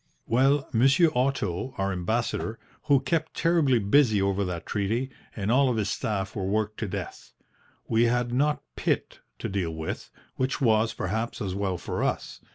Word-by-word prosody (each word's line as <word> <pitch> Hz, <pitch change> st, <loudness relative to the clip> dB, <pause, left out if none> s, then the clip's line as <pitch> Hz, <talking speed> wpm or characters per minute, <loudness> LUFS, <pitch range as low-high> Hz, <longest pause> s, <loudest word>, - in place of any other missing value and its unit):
"Well, 135 Hz, +4 st, +3 dB
Monsieur 135 Hz, +8 st, +5 dB
Otto, 125 Hz, -3 st, -1 dB
our 95 Hz, 0 st, 0 dB
Ambassador, 110 Hz, +4 st, -1 dB, 0.3 s
was 140 Hz, -2 st, +5 dB
kept 165 Hz, -2 st, -1 dB
terribly 165 Hz, -6 st, +3 dB
busy 110 Hz, +1 st, +4 dB
over 100 Hz, 0 st, +1 dB
that 85 Hz, -2 st, -4 dB
treaty, 115 Hz, +6 st, -1 dB, 0.2 s
and 105 Hz, 0 st, -1 dB
all 135 Hz, +2 st, +4 dB
of 120 Hz, -, 0 dB
his 105 Hz, -2 st, 0 dB
staff 100 Hz, -3 st, -2 dB
were 100 Hz, -, -2 dB
worked 105 Hz, +2 st, -1 dB
to 110 Hz, -, -2 dB
death. 90 Hz, -, -6 dB, 0.5 s
We 115 Hz, +1 st, +3 dB
had 120 Hz, 0 st, +1 dB
not 145 Hz, +4 st, +1 dB
Pitt -, -, -1 dB, 0.2 s
to -, -, -4 dB
deal 90 Hz, -5 st, -2 dB
with, 80 Hz, 0 st, -5 dB, 0.3 s
which 130 Hz, +1 st, 0 dB
was, 115 Hz, -3 st, +3 dB
perhaps, 110 Hz, +5 st, -2 dB
as 95 Hz, -3 st, -3 dB
well 95 Hz, -2 st, -1 dB
for -, -, -3 dB
us. -, -, -2 dB
110 Hz, 165 wpm, -27 LUFS, 100-130 Hz, 0.5 s, Monsieur